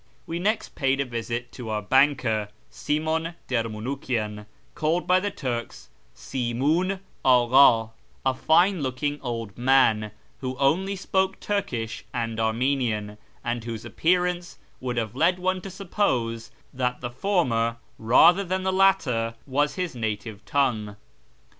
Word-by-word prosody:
We 165 Hz, +1 st, -4 dB
next 215 Hz, +5 st, 0 dB
paid 135 Hz, 0 st, +1 dB
a 140 Hz, -, +1 dB
visit 120 Hz, 0 st, -4 dB
to 120 Hz, -4 st, -8 dB
our 105 Hz, -1 st, -2 dB
banker, 125 Hz, -4 st, +2 dB, 0.2 s
Simon 160 Hz, +2 st, -1 dB
Dermounukian, 115 Hz, -2 st, -3 dB, 0.3 s
called 160 Hz, +3 st, 0 dB
by 185 Hz, 0 st, +4 dB
the 205 Hz, +2 st, -1 dB
Turks 125 Hz, -10 st, -5 dB
" 60 Hz, -, -36 dB
Simiin 150 Hz, +10 st, -1 dB, 0.2 s
Agha," 125 Hz, -2 st, +5 dB, 0.3 s
a 130 Hz, -, +3 dB
fine 170 Hz, +6 st, +3 dB
looking 145 Hz, +2 st, -2 dB
old 115 Hz, -6 st, -4 dB
man, 120 Hz, -4 st, +4 dB, 0.3 s
who 130 Hz, -1 st, -4 dB
only 175 Hz, +9 st, +2 dB
spoke 190 Hz, 0 st, 0 dB
Turkish 125 Hz, -, -3 dB
and 115 Hz, -2 st, -2 dB
Armenian, 110 Hz, -2 st, 0 dB, 0.2 s
and 120 Hz, -1 st, -2 dB
whose 115 Hz, -2 st, -6 dB
appearance 180 Hz, 0 st, 0 dB, 0.2 s
would 125 Hz, -1 st, -3 dB
have 115 Hz, 0 st, -2 dB
led 170 Hz, +6 st, +3 dB
one 185 Hz, 0 st, -1 dB
to 195 Hz, -, -7 dB
suppose 130 Hz, -, -1 dB, 0.2 s
that 125 Hz, -1 st, -1 dB
the 120 Hz, -1 st, -4 dB
former 120 Hz, -, 0 dB, 0.2 s
rather 170 Hz, -, +6 dB
than 185 Hz, 0 st, -2 dB
the 190 Hz, 0 st, 0 dB
latter 140 Hz, -13 st, +2 dB
was 145 Hz, +2 st, 0 dB
his 180 Hz, -2 st, -2 dB
native 110 Hz, -2 st, -4 dB
tongue. 110 Hz, -7 st, 0 dB
130 Hz, 135 wpm, -25 LUFS, 115-175 Hz, 0.3 s, rather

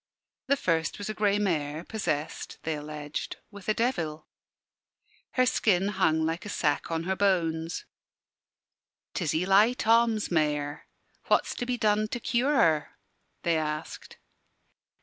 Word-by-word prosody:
The 280 Hz, +1 st, +3 dB
first 165 Hz, -, 0 dB
was 205 Hz, +1 st, -4 dB
a -, -, -5 dB
grey 205 Hz, -1 st, +2 dB
mare, 160 Hz, -6 st, -1 dB
possessed 170 Hz, -8 st, -3 dB
(they 160 Hz, -, -1 dB
alleged) 150 Hz, 0 st, -5 dB
with 205 Hz, 0 st, -8 dB
a -, -, +4 dB
devil. 165 Hz, -11 st, -1 dB, 1.1 s
Her 255 Hz, -1 st, +4 dB
skin 200 Hz, -5 st, +2 dB
hung 160 Hz, -6 st, +2 dB
like 165 Hz, +2 st, -2 dB
a 210 Hz, -, -7 dB
sack 150 Hz, -7 st, 0 dB
on 165 Hz, 0 st, -1 dB
her 190 Hz, +2 st, -1 dB
bones. 170 Hz, -4 st, 0 dB, 1.3 s
"'Tis 165 Hz, -5 st, -1 dB
Eli 195 Hz, +7 st, +4 dB
Thoms' 230 Hz, -3 st, +2 dB
mare. 150 Hz, -3 st, 0 dB, 0.4 s
What's -, -, +2 dB
to 245 Hz, -, -4 dB
be 250 Hz, -1 st, 0 dB
done 215 Hz, -1 st, +2 dB
to 240 Hz, -, -4 dB
cure 255 Hz, +5 st, +1 dB
her?" 155 Hz, -, +2 dB, 0.5 s
they 170 Hz, -1 st, +2 dB
asked. 155 Hz, 0 st, -5 dB
180 Hz, 135 wpm, -28 LUFS, 155-215 Hz, 1.3 s, a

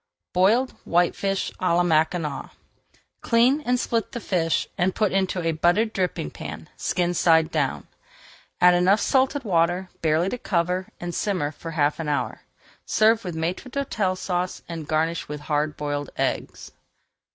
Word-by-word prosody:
BOILED 215 Hz, +8 st, +3 dB
WHITEFISH 185 Hz, +3 st, 0 dB
À 180 Hz, -2 st, +2 dB
LA 175 Hz, -, +3 dB
MACKINAC 160 Hz, -2 st, 0 dB, 0.7 s
Clean 250 Hz, +5 st, +3 dB
and 250 Hz, -2 st, +1 dB
split 230 Hz, -2 st, -1 dB
the 240 Hz, -, -3 dB
fish 170 Hz, -6 st, 0 dB
and 185 Hz, 0 st, 0 dB
put 210 Hz, -3 st, +1 dB
into 190 Hz, -2 st, 0 dB
a 165 Hz, -, +1 dB
buttered 175 Hz, +8 st, +2 dB
dripping 180 Hz, -, -2 dB
pan, -, -, -8 dB
skin 175 Hz, -1 st, 0 dB
side 160 Hz, -2 st, +3 dB
down. -, -, -1 dB, 0.7 s
Add 180 Hz, 0 st, +7 dB
enough 180 Hz, +4 st, +4 dB
salted 270 Hz, +1 st, +1 dB
water 180 Hz, -1 st, +1 dB
barely 160 Hz, +3 st, +2 dB
to 250 Hz, -, -4 dB
cover, 180 Hz, -1 st, 0 dB
and 175 Hz, 0 st, -5 dB
simmer 180 Hz, -8 st, -1 dB
for 165 Hz, +2 st, -9 dB
half 150 Hz, -2 st, 0 dB
an 160 Hz, -2 st, -3 dB
hour. 140 Hz, -4 st, -2 dB, 0.4 s
Serve 220 Hz, +1 st, +3 dB
with 180 Hz, -4 st, -5 dB
Maître 175 Hz, +10 st, -3 dB
d'Hôtel 220 Hz, -9 st, -1 dB
Sauce 180 Hz, -1 st, -2 dB
and 165 Hz, -3 st, -6 dB
garnish 160 Hz, +2 st, 0 dB
with 150 Hz, 0 st, -6 dB
hard 150 Hz, 0 st, -1 dB
boiled 145 Hz, -1 st, -3 dB
eggs. -, -, -3 dB
175 Hz, 150 wpm, -24 LUFS, 160-200 Hz, 0.7 s, Add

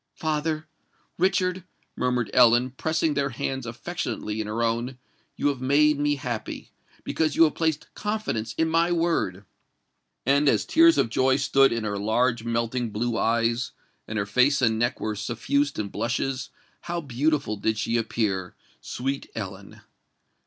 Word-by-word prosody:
"Father—Richard," 160 Hz, +4 st, -2 dB, 0.3 s
murmured 125 Hz, -4 st, 0 dB
Ellen, 120 Hz, +1 st, +5 dB
pressing 160 Hz, +3 st, 0 dB
their 140 Hz, -1 st, 0 dB
hands 130 Hz, 0 st, -4 dB
affectionately 115 Hz, -4 st, -4 dB
in 105 Hz, -, -5 dB
her 110 Hz, +2 st, -1 dB
own, 120 Hz, +3 st, -1 dB, 0.4 s
"you 145 Hz, -, +1 dB
have 135 Hz, -3 st, -3 dB
made 145 Hz, +3 st, +3 dB
me 145 Hz, 0 st, +2 dB
happy—because 140 Hz, +4 st, -4 dB
you -, -, +6 dB
have 155 Hz, -, +3 dB
placed 160 Hz, -2 st, -2 dB
confidence 210 Hz, -, -3 dB
in 160 Hz, -, +2 dB
my 165 Hz, +2 st, +2 dB
word!" 165 Hz, -, 0 dB, 0.8 s
And 140 Hz, +2 st, +4 dB
as -, -, +2 dB
tears 330 Hz, +1 st, +5 dB
of -, -, +2 dB
joy 130 Hz, +2 st, +3 dB
stood 135 Hz, 0 st, +4 dB
in 115 Hz, -1 st, -1 dB
her 100 Hz, -1 st, -2 dB
large 120 Hz, +3 st, +1 dB
melting 115 Hz, +1 st, -1 dB
blue 115 Hz, +3 st, -2 dB
eyes, 115 Hz, 0 st, +1 dB, 0.3 s
and 110 Hz, -, -4 dB
her 100 Hz, -, 0 dB
face 125 Hz, +7 st, +3 dB
and 110 Hz, -3 st, +2 dB
neck 120 Hz, +2 st, 0 dB
were 110 Hz, -1 st, -2 dB
suffused 140 Hz, +7 st, -1 dB
in 105 Hz, -1 st, -2 dB
blushes, 120 Hz, +5 st, -2 dB, 0.3 s
how 175 Hz, 0 st, -3 dB
beautiful 140 Hz, -3 st, 0 dB
did 110 Hz, +1 st, -1 dB
she 110 Hz, +2 st, -1 dB
appear—sweet 115 Hz, +5 st, -3 dB
Ellen! 100 Hz, -2 st, -7 dB
125 Hz, 145 wpm, -25 LUFS, 115-150 Hz, 0.8 s, you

